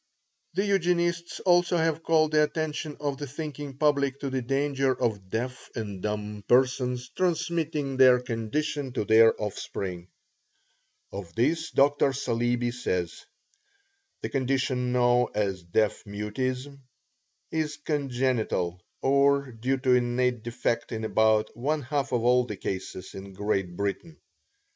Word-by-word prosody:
The 195 +2 +1
Eugenists 175 -3 0
also 175 -1 +3
have 160 -1 +1
called 160 -1 +3
the 155 0 +4
attention 155 0 -3
of 145 -2 -2
the 145 - -4
thinking 145 -1 -6
public 140 -2 +2
to 140 -2 -3
the 130 -1 -1
danger 135 +1 0
of 105 -6 -1
deaf 125 +5 -4
and 105 -5 -5
dumb 105 0 -4
persons 125 0 +2
transmitting 165 -5 -1
their 130 -1 +7
condition 130 +4 -3
to 115 - -1
their 115 +1 +6
offspring. 95 -3 -4 1.0
Of 95 -4 -8
this 160 +7 +1
Dr. 140 0 +3
Saleeby 120 -2 0
says: 90 -8 -3 1.0
"The - - -3
condition 130 -2 0
known 125 0 +3
as 100 -3 -1
deaf 100 +5 0
mutism 125 +7 -3 0.7
is 155 -2 -1
congenital 125 - -1 0.2
or 140 0 +3
due 125 +4 -1
to 130 -1 +2
innate 125 -1 +1
defect 115 0 -2
in 110 -1 -3
about 110 0 +2
one 145 +5 -1
half 140 +1 -2
of 120 -2 +1
all 125 +1 +4
the 105 - -5
cases 95 0 -5
in 95 0 -9
Great 95 -3 -1
Britain." 100 - -3
130 Hz, 130 wpm, -27 LUFS, 110-145 Hz, 1.0 s, their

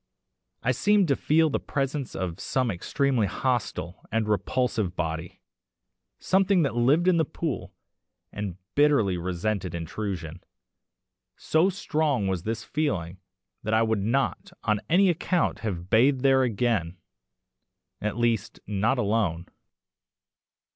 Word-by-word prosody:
I - - +2
seemed 205 -3 +3
to 140 - +4
feel 160 +2 +2
the - - 0
presence 135 -1 -3
of 90 -2 -3
some 130 -3 0
extremely 125 +4 0
hostile 105 -7 -2
and 110 -1 0
repulsive 105 -1 0
body 80 0 -4 0.8
something 190 -2 +3
that 140 - 0
lived 140 +9 +3
in 180 -2 +5
the 160 - +3
pool 160 -1 -4 0.6
and 100 -4 -5 0.2
bitterly 140 -10 +3
resented 90 +1 -2
intrusion. 85 -1 -5 0.9
So 160 +5 +2
strong 150 - 0
was 95 -3 -1
this 110 +3 -3
feeling 95 - -2 0.4
that 110 +1 0
I 110 - +4
would 110 -2 0
not 135 - -1
on 105 -2 +1
any 190 +4 +5
account 175 0 0
have 90 -5 -5
bathed 130 +4 +4
there 135 -1 +4
again 110 -7 0 1.0
at 105 +1 -2
least, 115 -3 0
not 105 +6 +1
alone. 100 -7 0
115 Hz, 125 wpm, -26 LUFS, 95-140 Hz, 1.0 s, in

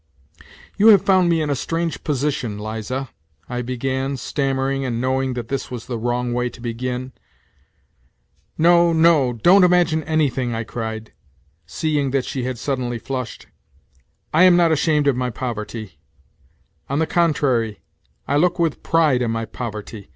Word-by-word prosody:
" 80 - -22
You 210 - +6
have 200 -4 +7
found 185 -3 +3
me 165 -2 +2
in 150 - -1
a - - +1
strange 165 +4 -3
position, 140 -7 -2
Liza," 110 +5 -4 0.4
I 125 -1 -3
began, 130 +2 -2
stammering 135 0 -1
and 120 -3 -2
knowing 130 0 0
that 120 -2 -5
this 135 -1 -3
was 120 -2 -7
the 120 -2 -4
wrong 120 +1 -1
way 125 0 0
to 120 - -15
begin. 125 +2 -4 0.8
" - - -42
No, 170 -1 +5
no, 160 -6 +4
don't 180 - +5
imagine 175 -3 +3
anything," 135 -6 0
I 115 - -2
cried, 110 -1 -6 0.5
seeing 145 - -1
that 135 -1 0
she 130 -3 -4
had 130 -1 -3
suddenly 125 -2 -2
flushed. 130 -1 -5 0.5
" 65 -1 -40
I 160 - +4
am 185 -1 +7
not 170 -2 +4
ashamed 150 -1 +2
of 140 -3 +3
my 125 0 -1
poverty.... 110 -3 -6 0.9
On 140 - -1
the 160 - +2
contrary 135 - +1 0.5
I 140 - +1
look 175 +3 +2
with 165 -4 0
pride 155 -6 +2
on 120 - 0
my 115 0 -2
poverty. 105 -5 -7
130 Hz, 165 wpm, -21 LUFS, 120-155 Hz, 0.9 s, have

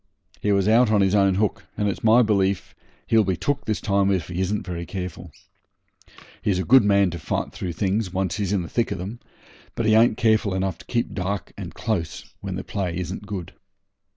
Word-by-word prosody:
He 105 - +1
was 100 -1 +2
out 115 +2 +5
on 105 -2 +3
his 95 0 +2
own 100 -2 +4
hook, 105 +1 -1
and 105 - +1
it's 100 - -3
my 115 +2 +6
belief 100 -3 0 0.3
he'll 110 -1 +4
be 95 -3 -1
took 145 - -1
this 110 - -1
time 100 -1 +1
if 95 -3 0
he 90 +1 -2
isn't 100 +1 -1
very 85 -2 -4
careful. 90 -1 -6 1.1
He's 100 -3 +1
a 95 - 0
good 130 -2 +7
man 100 -2 +3
to 85 - -6
fight - - -2
through 90 -2 -5
things 95 +3 -1
when 95 +1 -1
once 90 0 -2
he's 100 -3 -1
in 100 -3 +1
the - - -6
thick 120 +5 0
of - - -4
'em, 100 +7 -6 0.6
but 115 - -1
he 110 - +4
ain't 110 0 +5
careful 110 -3 +2
enough 95 -2 -2
to - - -14
keep 120 -1 -1
dark 100 +1 -3
and - - -8
close 100 -8 -3 0.2
when - - -4
the - - -4
play 90 -4 -3
isn't 95 +3 -5
good. 95 -3 -6
100 Hz, 220 wpm, -24 LUFS, 95-110 Hz, 1.1 s, good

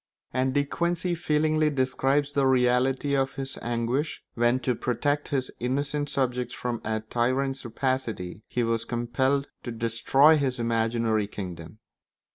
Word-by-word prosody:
And 130 +1 0
De 145 - +4
Quincey 175 +3 -1
feelingly 155 -2 +2
describes 135 +1 +1
the 140 -2 +2
reality 130 +2 +2
of 135 0 0
his 135 0 -4
anguish 120 +6 -1
when, 120 +2 +2
to 125 - +1
protect 145 +5 -1
his 135 -4 -2
innocent 145 +4 -1
subjects 125 -2 -1
from 120 -2 -3
a 110 0 -1
tyrant's 130 +4 -1
rapacity, 115 -6 -2
he 120 - -1
was 115 -1 0
compelled 130 +4 0 0.2
to 120 - -5
destroy 120 +7 +4
his 135 -3 0
imaginary 115 -2 +1
kingdom. 90 -3 -7
130 Hz, 135 wpm, -27 LUFS, 115-140 Hz, 0.2 s, De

